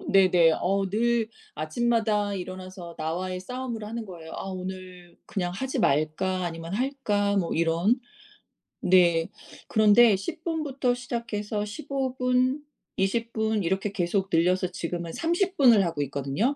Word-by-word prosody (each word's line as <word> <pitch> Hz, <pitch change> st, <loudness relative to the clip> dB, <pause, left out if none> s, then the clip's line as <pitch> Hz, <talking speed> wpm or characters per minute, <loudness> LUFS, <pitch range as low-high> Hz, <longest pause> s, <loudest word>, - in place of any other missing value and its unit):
음 -, -, -5 dB
네네. 180 Hz, -4 st, +6 dB
어 195 Hz, +2 st, +1 dB
늘 230 Hz, +1 st, +1 dB, 0.3 s
아침마다 210 Hz, +4 st, 0 dB
일어나서 185 Hz, -2 st, -7 dB
나와의 180 Hz, +4 st, -3 dB
싸움을 240 Hz, 0 st, -5 dB
하는 225 Hz, +1 st, -5 dB
거예요. 165 Hz, -4 st, -10 dB
'아 -, -, -5 dB
오늘 185 Hz, -1 st, -7 dB
그냥 180 Hz, -3 st, -2 dB
하지 265 Hz, +8 st, -3 dB
말까? 155 Hz, +6 st, +1 dB
아니면 165 Hz, +1 st, -5 dB
할까?' 210 Hz, -6 st, 0 dB
뭐 180 Hz, -4 st, 0 dB
이런 170 Hz, +9 st, +2 dB, 0.8 s
네. 170 Hz, -3 st, +4 dB, 0.4 s
그런데 215 Hz, 0 st, +6 dB
10 195 Hz, -, -6 dB
분부터 285 Hz, -6 st, 0 dB
시작해서 220 Hz, -4 st, -3 dB
15 265 Hz, +2 st, -3 dB
분, 255 Hz, +3 st, +1 dB, 0.3 s
20 230 Hz, +5 st, 0 dB
분 220 Hz, -2 st, 0 dB
이렇게 190 Hz, +4 st, -1 dB
계속 195 Hz, 0 st, -1 dB
늘려서 180 Hz, +2 st, +2 dB
지금은 170 Hz, -1 st, -4 dB
30 360 Hz, +3 st, 0 dB
분을 235 Hz, -7 st, +6 dB
하고 165 Hz, -4 st, -2 dB
있거든요. 140 Hz, -, -1 dB
200 Hz, 265 characters per minute, -26 LUFS, 175-235 Hz, 0.8 s, 네네